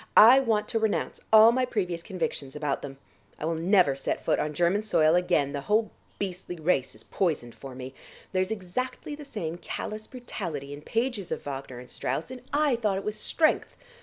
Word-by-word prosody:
I 240 +5 +10
want 220 -5 +1
to 225 - +1
renounce 220 -1 -1
all 220 +1 +9
my 255 +2 +1
previous 180 -9 -1
convictions 170 -7 -4
about 150 -2 -1
them. 135 -1 -7 0.4
I - - -4
will 165 - 0
never 170 -3 +3
set 135 - -3
foot - - +2
on 150 0 -2
German 175 +5 +2
soil 160 -7 +3
again; 175 -5 +2
the 140 - -3
whole 215 +6 +1 0.3
beastly 185 -2 -4
race 155 -7 0
is 110 - -12
poisoned 155 -11 -1
for 125 +4 -10
me. 130 +1 -7 0.4
There's 185 0 +1
exactly 220 +8 -4
the 295 0 -8
same 175 - -5
callous 215 +3 -5
brutality 155 - -6
in 145 - -8
pages 230 - -2
of - - -3
Wagner 135 -3 -6
and 125 0 -10
Strauss, 135 - -3
and 255 -1 -8
I 290 -4 +3
thought 210 -4 0
it 195 - -4
was 210 - -2
strength! 310 +6 +1
180 Hz, 195 wpm, -27 LUFS, 150-220 Hz, 0.4 s, I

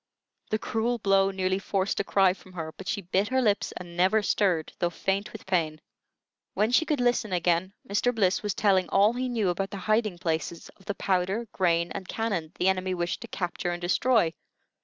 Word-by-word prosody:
The 215 - +1
cruel 225 +2 -1
blow 195 -2 +3
nearly 190 0 0
forced 195 0 -1
a - - +1
cry 195 -2 +3
from 185 0 -17
her; 160 -3 -5
but 190 - -10
she 200 - -2
bit 190 +4 +1
her 260 +2 +1
lips 215 -5 +1
and 175 -1 -9
never 190 +5 +3
stirred, 180 -7 +1
though 175 - +1
faint 195 +3 -2
with - - -10
pain. 160 -5 0 0.8
When 210 +4 +2
she 285 +6 +4
could 300 -3 +1
listen 245 -4 +1
again, 175 +1 +1
Mr. 205 +5 +1
Bliss 200 -5 +1
was 210 -2 -2
telling 190 -3 +2
all 205 +3 +4
he 255 +1 -2
knew 220 -6 0
about 195 +3 -1
the 200 - -6
hiding 215 -1 0
places 165 -1 -3
of 195 - -21
the 205 - -3
powder, 190 +5 0
grain, 170 -2 +1
and 190 -2 -6
cannon 195 -9 -2
the 180 - +1
enemy 185 -1 +1
wished 175 -1 -2
to - - -7
capture 175 -1 -3
and 175 0 -3
destroy. 180 0 +2
190 Hz, 200 wpm, -27 LUFS, 175-210 Hz, 0.8 s, she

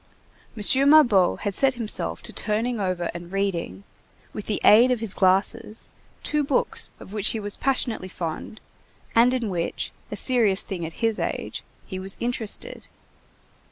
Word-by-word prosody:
M. 265 +7 +5
Mabeuf 240 - +5
had 205 - -2
set 265 +5 +3
himself 230 -3 -2
to - - -5
turning 225 +2 -1
over 185 -3 -2
and 175 0 -9
reading, 180 - -3 0.5
with 210 - -7
the 210 - -1
aid 235 +4 +7
of 250 -2 +1
his 220 -3 0
glasses, 205 +4 0 0.3
two 300 0 0
books 480 - -1
of 190 - -12
which 210 -1 +1
he 225 - -2
was 205 -1 -3
passionately 250 -7 -1
fond 175 +4 -6 0.5
and 235 +2 +5
in 250 -3 -1
which, 170 -2 -3 0.2
a - - -5
serious 225 -7 +3
thing 175 -5 -5
at 165 - -10
his 225 -2 0
age, - - -4 0.2
he 185 -2 -6
was 190 0 0
interested. 240 - -3
215 Hz, 155 wpm, -24 LUFS, 190-245 Hz, 0.5 s, aid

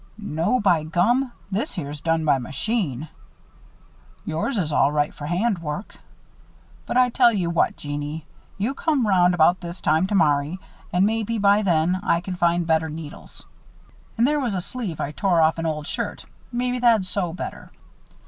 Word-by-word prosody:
"No, 205 +3 0
by 180 -6 +3
gum! 235 +11 +1 0.2
This 220 +10 -2
here's 145 -4 -6
done 165 -1 0
by 140 -3 +3
machine. 150 - -2 1.2
Yours 165 - -2
is 160 -6 -1
all 140 0 +3
right 150 0 0
for 145 - -7
hand 190 +4 0
work. 150 +4 -6 0.9
But - - -1
I 250 -1 +5
tell 240 -1 +5
ye 195 -5 -1
what, 170 0 +1
Jeannie. 145 +1 -5 0.3
You 215 +7 -1
come 285 -4 0
round 180 -3 +4
about 175 +2 +4
this 175 +1 -7
time 160 +4 +2
tomorry 155 -4 +2 0.3
and 180 +2 +3
maybe, 225 +1 0
by 205 0 +4
then, 175 -1 +2
I 170 -4 +2
can 180 +1 -5
find 175 0 +1
better 160 -1 +1
needles. 155 -1 -9 0.7
An' 230 - +4
there 295 +2 +2
was 240 -7 -1
a - - 0
sleeve 200 -5 -5
I 145 - -2
tore 180 +2 +1
off 160 +1 +3
an 165 - -1
old 150 -1 -3
shirt - - -4 0.3
maybe 250 +1 -1
that'd 230 -5 +4
sew 185 -2 -2
better." 180 - -7
175 Hz, 170 wpm, -23 LUFS, 155-215 Hz, 1.2 s, I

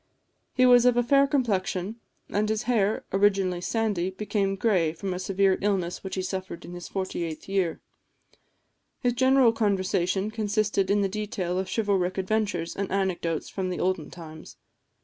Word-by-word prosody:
He 255 - +5
was 245 -1 +6
of 245 -1 +3
a 245 - +4
fair 275 +3 +4
complexion; 210 - -1 0.3
and 210 +1 0
his 220 +1 -1
hair, 220 -4 +1
originally 195 -3 +2
sandy, 205 -4 0
became 195 0 -1
gray 185 -6 +1
from 185 +3 -4
a 180 - -4
severe 190 0 +1
illness 190 -4 -1
which 190 -1 -5
he 185 - -2
suffered 185 -2 -5
in 175 - -9
his 175 0 -8
48th 175 -4 -4
year. 190 -4 -1 1.2
His 245 -2 +1
general 260 -1 +4
conversation 195 -2 0
consisted 215 -2 0
in 205 +1 +3
the 195 - +2
detail 195 -3 -3
of 190 0 -3
chivalric 195 -4 0
adventures 190 -3 -1
and 195 -1 -3
anecdotes 180 -4 -1
of 190 -2 -1
the 180 - -3
olden 185 -4 -1
times. 160 -2 -11
195 Hz, 160 wpm, -26 LUFS, 185-215 Hz, 1.2 s, was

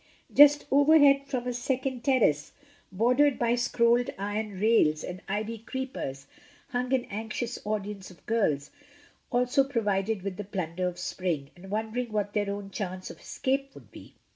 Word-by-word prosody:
Just 290 0 +7
overhead 285 -1 +5
from 255 -3 -3
a 250 - -1
second 255 0 -2
terrace, 220 - +2 0.4
bordered 250 +8 +3
by 235 -1 +2
scrolled 240 0 +2
iron 205 0 -3
rails 190 -8 +3
and 180 +1 -6
ivy 215 +3 -2
creepers, 230 - -5 0.4
hung 250 -1 -2
an 260 -2 +2
anxious 225 +3 -4
audience 210 -2 -4
of 180 - -18
girls, 160 -11 0 0.6
also 250 +2 +3
provided 210 -6 -1
with 195 -2 -4
the 205 - -4
plunder 185 -2 -3
of 180 -1 -5
spring, 170 -5 -3
and 190 +2 -13
wondering 220 +3 -2
what 205 -1 -1
their 205 -1 0
own 200 0 -5
chance 185 -2 -5
of - - -13
escape 275 +1 -2
would - - -15
be. - - -13
220 Hz, 155 wpm, -28 LUFS, 195-250 Hz, 0.6 s, Just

